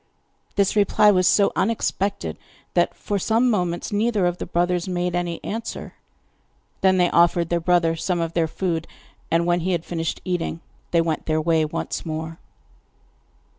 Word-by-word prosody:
This 200 0 +2
reply 210 0 +5
was 185 -2 +3
so 200 -1 +4
unexpected 205 -2 -1 0.3
that - - +2
for 205 -1 -2
some 230 +5 +2
moments 180 -3 -1
neither 210 -2 +1
of 175 0 -1
the - - -5
brothers 175 +1 0
made 180 -1 -1
any 175 -1 -2
answer. 225 +1 -5 0.9
Then 190 -1 +4
they 180 -1 +3
offered 170 0 +3
their 170 - +1
brother 170 -1 +2
some 175 +1 -1
of 165 0 -2
their 165 -2 +1
food, 165 -1 -2 0.4
and 165 +1 +2
when 175 0 +2
he 180 +2 -1
had 170 -1 -2
finished 165 -2 -3
eating 175 -2 -2 0.3
they 170 - +3
went 165 -2 -2
their 155 0 +1
way 160 0 +2
once 150 - -4
more. 160 0 -5
175 Hz, 165 wpm, -23 LUFS, 165-190 Hz, 0.9 s, reply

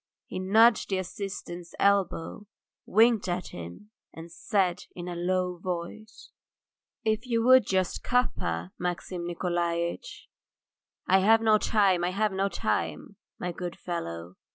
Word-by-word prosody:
He - - -6
nudged 220 +5 +4
the 190 - 0
assistant's 180 -2 -6
elbow, 200 0 +1 0.4
winked 225 -1 +4
at 180 0 -2
him, 85 - -10 0.2
and 165 +1 -11
said 180 -1 0
in 175 0 -6
a 175 - -4
low 180 +1 -1
voice: 185 +5 -6 0.7
"If 220 +2 0
you 230 -2 +1
would 255 -3 +6
just 185 -2 0
cup 250 0 +2
her, 85 +2 -3
Maxim 175 0 -3
Nikolaitch." 170 - -2 0.8
"I 190 - +4
have 220 +4 +5
no 215 -1 +4
time, 195 -6 +2
I 175 - +1
have 210 +3 0
no 195 +1 0
time, - - -2 0.2
my 180 - -3
good 175 0 -6
fellow. 85 - -5
185 Hz, 135 wpm, -28 LUFS, 175-210 Hz, 0.8 s, would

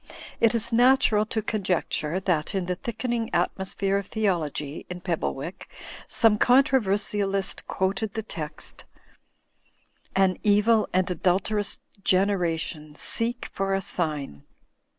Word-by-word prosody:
It 230 0 +4
is 230 +1 +1
natural 240 -3 +4
to 220 -1 -2
conjecture 185 -5 -1
that 180 -3 -1
in 185 -2 -1
he 180 - 0
thickening 235 +3 -3
atmosphere 190 +2 0
of 200 - -8
theology 165 -9 -1
in 180 0 -6
Pebblewick, 170 -2 -3 0.4
5ome 220 -3 +4
controversialist 205 -7 +2
quoted 195 +2 -1
the 220 - -2
text 155 -8 -7 1.3
*An 190 -1 +2
evil 210 +1 +3
and 185 0 +1
adulterous 190 +4 0 0.2
generation 170 -6 0
seek 235 +8 0
for 195 0 0
a 195 - -1
sign. 150 - -3
195 Hz, 110 wpm, -26 LUFS, 175-220 Hz, 1.3 s, It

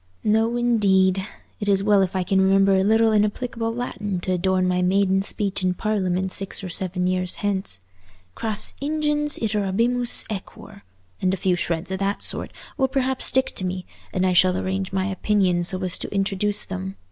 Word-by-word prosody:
"No 225 +3 +2
indeed. 195 -6 +2 0.4
It's 200 -2 +1
well 205 -1 +4
if 190 0 -1
I 185 - 0
can 190 +2 +1
remember 195 0 +4
a 190 - +2
little 220 +2 +3
inapplicable 225 +2 0
Latin 210 -5 -4
to 185 - -2
adorn 185 0 +1
my 180 0 +1
maiden 190 +1 +2
speech 195 -1 -1
in 185 0 +1
Parliament 190 -3 -1
six 195 +1 0
or 185 - -5
seven 180 +1 +1
years 185 0 0
hence. 190 - -1 0.5
'Cras 215 - 0
ingens 295 0 0
iterabimus 225 +3 +1
aequor,' 200 -1 -9 0.4
and 185 0 +1
a - - -10
few 185 0 +1
shreds 170 +1 -2
of 190 - -3
that 200 +1 -2
sort, - - -1 0.3
will 265 -3 +2
perhaps 265 -1 0
stick 265 0 +1
to - - -4
me, 185 0 -3 0.3
and 185 0 0
I 185 - +2
shall 185 +1 +4
arrange 190 0 -3
my 190 -1 -1
opinions 190 -3 +1
so 185 - -1
as 180 -2 -2
to - - -4
introduce 200 +1 0
them. 95 +1 -6
195 Hz, 180 wpm, -23 LUFS, 185-215 Hz, 0.5 s, well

